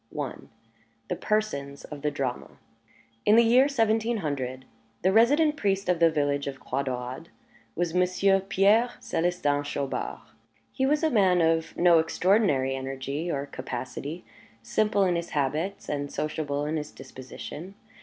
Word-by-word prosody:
I. 140 -4 -2 0.8
THE - - 0
PERSONS 140 -11 -2
OF 150 -2 -9
THE 150 - +1
DRAMA 135 -4 -4 0.7
In 210 - +5
the 235 - +7
year 250 +4 +5
seventeen 225 -3 +1
hundred, 130 -6 -4 0.4
the 190 - +4
resident 290 +8 +4
priest 195 -1 0
of 180 -2 +2
the 165 -1 +6
village 145 -2 0
of 135 -1 -5
Croix 130 +2 -2
Daurade 130 +3 -5 0.5
was 175 -2 -1
Monsieur 185 +2 +3
Pierre 205 +5 +3
Célestin 165 -4 0
Chaubard. 135 - -3 0.5
He 265 - +1
was 300 +3 +1
a 315 - +3
man 190 -6 +4
of 165 -1 +1
no 170 -1 +6
extraordinary 160 -5 +2
energy 135 +4 -4
or 140 -3 -2
capacity, 135 +5 -6 0.4
simple 205 - +1
in 180 -2 +2
his 170 0 -3
habits, 155 +8 -1
and 145 -1 -3
sociable 145 -1 -2
in 155 +2 -1
his 150 0 -4
disposition. 135 +7 -9
160 Hz, 145 wpm, -27 LUFS, 140-200 Hz, 0.8 s, the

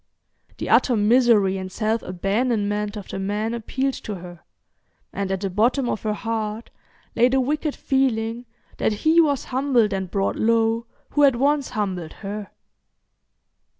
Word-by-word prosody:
The - - -4
utter 250 - +4
misery 210 -3 +4
and 185 0 -6
self 220 +2 -1
abandonment 205 +2 -1
of 205 - -9
the 195 - -4
man 210 +3 -2
appealed 260 +4 -2
to 210 - -4
her, 175 -1 -10 0.7
and 200 -1 -2
at 190 -1 -2
the 195 - -1
bottom 240 +7 +2
of 220 - -2
her 215 -1 -1
heart 220 0 -4 0.4
lay 240 +2 +4
the 265 +1 +2
wicked 295 +3 -1
feeling 240 -3 0 0.3
that - - +1
he 325 +2 +6
was 285 -5 +1
humbled 255 -5 +1
and 190 -1 -3
brought 195 +1 -1
low 230 +1 +2 0.2
who 290 - +1
had 275 -3 +6
once 280 +2 +1
humbled 190 -7 -3
her. 205 0 -5
225 Hz, 150 wpm, -23 LUFS, 205-255 Hz, 0.7 s, he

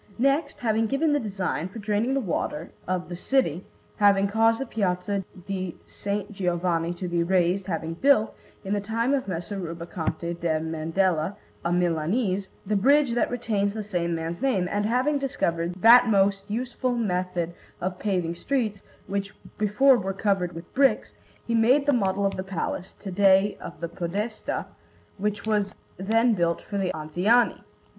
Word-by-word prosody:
Next, 275 +4 +1
having 225 -1 +1
given 290 +5 +1
the 290 - +3
design 190 - -2
for 200 - -10
draining 215 +4 0
the - - +2
waters 165 -5 -3 0.2
of 185 -1 -1
the 175 - -6
city, 185 - 0 0.3
having 200 -1 +4
caused 225 +2 +3
the 270 - -2
Piazza 195 -3 -1 0.2
di 185 -3 -4
S. 200 0 -3
Giovanni 175 -3 0
to 180 +1 -4
be 175 -1 0
raised, 185 +2 +1
having 165 -2 -2
built, 220 +3 +3 0.3
in 195 - -1
the 205 - 0
time 230 +5 0
of 270 -5 0
Messer 180 +2 -4
Rubaconte 170 0 -4
da 165 -2 +1
Mandella, 165 +3 0 0.3
a 170 - 0
Milanese, 180 +4 0 0.2
the 210 +2 0
bridge 275 +5 +4
that 240 - +1
retains 210 -4 -1
the 215 - -3
same 175 -4 -1
man's 165 +1 -4
name, 205 -10 +1
and 205 +1 0
having 260 +5 +1
discovered 175 -11 -1
that 240 +2 +9
most 195 0 +2
useful 245 +3 -2
method 180 -5 -1 0.3
of 180 0 -3
paving 180 -5 0
streets, 215 0 -2 0.2
which 200 +1 -3 0.2
before 230 +6 +5
were 195 0 -3
covered 195 -3 0
with 165 +1 -10
bricks, 270 0 +2 0.3
he 235 - -2
made 245 +5 +4
the 290 - +3
model 200 -4 +1
of 195 - 0
the 185 - -2
Palace, 190 0 -4
to 195 - -6
day 195 +1 +4
of - - -8
the 170 - -3
Podestà, 195 +7 -3 0.5
which 210 +1 -2
was 210 -2 0 0.2
then 225 +5 +2
built 170 -4 +1
for 200 - -5
the 185 -2 0
Anziani. 180 +10 +2
195 Hz, 165 wpm, -26 LUFS, 175-225 Hz, 0.5 s, that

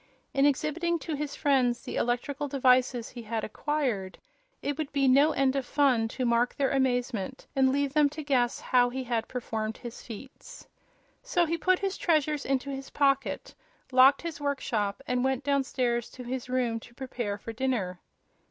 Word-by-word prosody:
In 275 +1 +4
exhibiting 335 +5 0
to 325 0 -5
his 290 -1 -3
friends 255 -4 +2
the - - -6
electrical 270 +4 -1
devices 255 -3 +2
he 245 - -9
had 225 -1 -3
acquired 240 -7 -2 0.5
it 285 - -1
would 305 -1 -4
be 275 -1 +2
"no 280 +4 +5
end 270 -2 +1
of 275 - 0
fun" 255 -4 +2
to 255 +3 -3
mark 235 +1 +2
their 275 -1 +1
amazement 255 -3 -1
and 265 -1 +4
leave 280 0 0
them 300 -1 +4
to 305 +2 -7
guess 250 -4 +1
how 245 -1 +3
he 260 +1 -4 0.2
performed 220 -3 -3
his 240 -2 -8
feats. 270 - -11 0.5
So 355 -9 +1
he 335 +1 0
put 370 +2 +2
his 390 0 -2
treasures 305 -3 +1
into 270 +1 0
his 270 0 -6
pocket, 275 -1 0 0.4
locked 260 +4 +6
his 325 -3 -5
workshop 245 -6 -1
and 250 0 0
went 265 0 0
downstairs 255 -4 0
to 255 - -8
his 250 0 -5
room 245 -3 0
to 240 +1 -16
prepare 240 -6 -4
for 225 +2 -7
dinner. 220 -8 -1
265 Hz, 170 wpm, -28 LUFS, 245-285 Hz, 0.5 s, locked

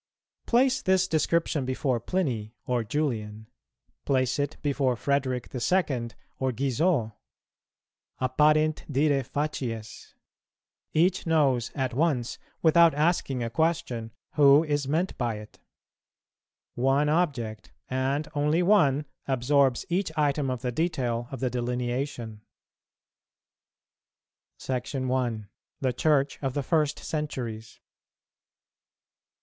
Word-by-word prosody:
Place 260 +2 +3
this 190 -1 +2
description 160 -2 +1
before 130 -1 -1
Pliny 120 - -2
or 125 -2 0
Julian; 110 -4 -2 0.6
place 130 -1 +1
it 145 +1 -2
before 140 -3 +1
Frederick 130 -1 -1
the 130 - -5
Second 120 - 0 0.2
or 130 -1 0
Guizot.[208:1] 135 - 0 1.1
"Apparent 150 +4 +2
diræ 140 -2 +1
facies." 125 -7 -4 0.8
Each 175 +3 +2
knows 140 -7 +2
at 130 -3 -1
once, 135 -4 0 0.2
without 165 -1 +6
asking 150 -5 +1
a 115 - -3
question, 125 -6 -1 0.2
who 145 0 +6
is 145 -3 -1
meant 165 +6 0
by 120 -3 0
it. 105 0 -11 1.1
One 135 +4 +2
object, 135 - -1 0.2
and 135 +3 -1
only 150 +4 +2
one, 155 -8 +4 0.2
absorbs 135 0 +2
each 180 0 -1
item 145 -2 +1
of 125 -2 -3
the 125 - -1
detail 125 -6 -1
of 135 - -7
the 130 -2 0
delineation. 120 -2 -3 2.2
SECTION 130 0 -3
I. 120 -4 -1 0.4
THE 130 -2 0
CHURCH 140 +1 +1
OF 135 -2 -2
THE 145 - -1
FIRST 150 -1 +1
CENTURIES. 120 -8 -5
135 Hz, 110 wpm, -27 LUFS, 125-155 Hz, 2.2 s, without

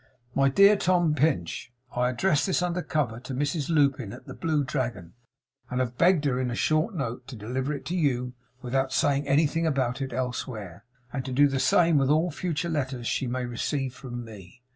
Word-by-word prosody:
"My 135 0 +3
dear 200 +8 +6
Tom 175 -4 +2
Pinch 140 - 0 0.2
I 125 0 +2
address 150 +6 +1
this 185 -1 +1
under 180 0 -1
cover 130 -10 -1
to 130 +1 -6
Mrs 145 +2 -1
Lupin, 140 -9 +2
at - - -11
the - - -8
Blue 155 -3 0
Dragon, 120 - -3 0.6
and 125 - -2
have 125 -1 -1
begged 170 0 +3
her 130 -3 +1
in 130 -1 -1
a 120 - -3
short 155 - +1
note 125 -4 -4
to 135 - -8
deliver 125 +6 -3
it 140 -2 -5
to 170 +5 -2
you 125 -7 0 0.3
without 130 +2 0
saying 140 +1 +1
anything 155 +3 +2
about 135 -3 0
it 135 -1 -3
elsewhere; 120 -7 -4 0.3
and 135 -2 -2
to 130 - -4
do 145 +3 +5
the 135 -1 -1
same 165 +1 +4
with 135 -1 +1
all 160 +4 +3
future 170 +1 -2
letters 135 -6 -2
she 130 - -1
may 125 +1 -2
receive 130 +2 -2
from 120 -2 -7
me. 110 +2 -13
135 Hz, 200 wpm, -27 LUFS, 125-155 Hz, 0.6 s, dear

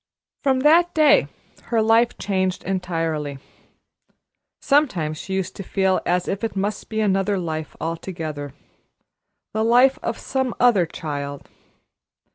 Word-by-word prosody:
From 265 -2 +2
that 335 +5 +4
day 310 -2 +5 0.4
her 230 - 0
life 225 +2 +3
changed 190 -2 -1
entirely. 165 -6 -2 1.2
Sometimes 180 - +1
she 190 - -4
used 190 -2 -3
to - - -5
feel 190 0 +1
as 180 0 +1
if 195 +3 -3
it 225 - -2
must 200 +1 -3
be 220 0 -1
another 195 -1 +1
life 160 -3 -4
altogether, 160 -3 -5 1.0
the 220 - 0
life 245 +4 +4
of - - -3
some 265 -3 -2
other 215 -9 +4
child. 145 -4 -6
190 Hz, 125 wpm, -22 LUFS, 165-230 Hz, 1.2 s, day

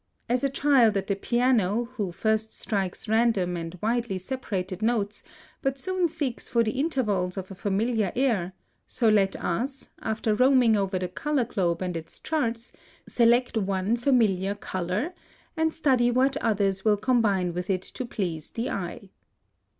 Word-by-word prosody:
As 250 +2 0
a 275 - +2
child 265 -6 +4
at 195 - -2
the 200 - 0
piano, 235 -1 +2
who 205 -7 -3
first 220 +4 0
strikes 195 -1 -2
random 220 -5 +2
and 165 +1 -6
widely 230 -3 0
separated 190 -4 -4
notes, 215 -2 0 0.4
but 270 0 -1
soon 370 +4 0
seeks 275 -6 -3
for 235 -1 +3
the 220 - 0
intervals 215 - 0
of 190 0 -5
a - - -5
familiar 205 +2 0
air, 220 -9 +1 0.3
so 235 - 0
let 200 -3 +3
us, 260 +10 -3
after 220 0 0
roaming 255 -1 +5
over 195 -2 0
the 180 0 -2
color 280 +7 -1
globe 185 -6 -1
and 180 -1 -3
its 165 -1 -7
charts, 235 -7 -2 0.4
select 240 +1 +3
one 195 0 0
familiar 220 -7 +2
color, 190 - -3 0.4
and 320 -1 +1
study 265 -7 +2
what 260 +3 +2
others 200 -6 0
will 210 -2 +3
combine 205 -6 +1
with 180 +3 -4
it 185 -1 0
to - - -5
please 175 -10 -3
the 230 +2 -3
eye. 190 +1 -5
220 Hz, 160 wpm, -26 LUFS, 190-250 Hz, 0.4 s, roaming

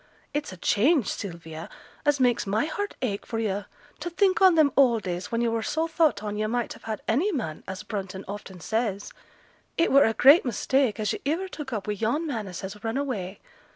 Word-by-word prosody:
It's 295 -4 -2
a 185 - -9
change, 245 - +3
Sylvia, 170 -4 -6 0.4
as 290 -1 +3
makes 245 -5 +2
my 215 +7 +1
heart 405 +6 -4
ache 205 -5 -1
for 225 - -5
yo', 205 -2 -1 0.3
to 345 - -4
think 385 +3 +2
on 375 -3 +7
them 305 -3 +5
old 240 -6 +4
days 180 0 -4
when 230 0 0
yo' 235 -1 +1
were 230 0 0
so 320 +8 -1
thought 320 -10 +2
on 210 0 -3
yo' 215 0 0
might 240 +1 -1
have - - -16
had 220 -2 -4
any 305 - +2
man, 215 - -4
as 190 +2 -6
Brunton 195 -3 -5
often 195 -2 -8
says; 210 +1 -2 0.6
it 335 - +3
were 275 +1 +7
a 225 - +1
great 285 +7 +7
mistake 255 -1 +1
as 210 -1 0
yo' - - -4
iver 370 +4 -1
took 295 -7 -7
up 215 -4 -3
wi' 210 - -1
yon 230 - -1
man 230 -9 -3
as 180 -2 -7
has 200 +3 -7
run 225 +3 -1
away. 210 -9 -3
225 Hz, 220 wpm, -26 LUFS, 200-285 Hz, 0.6 s, on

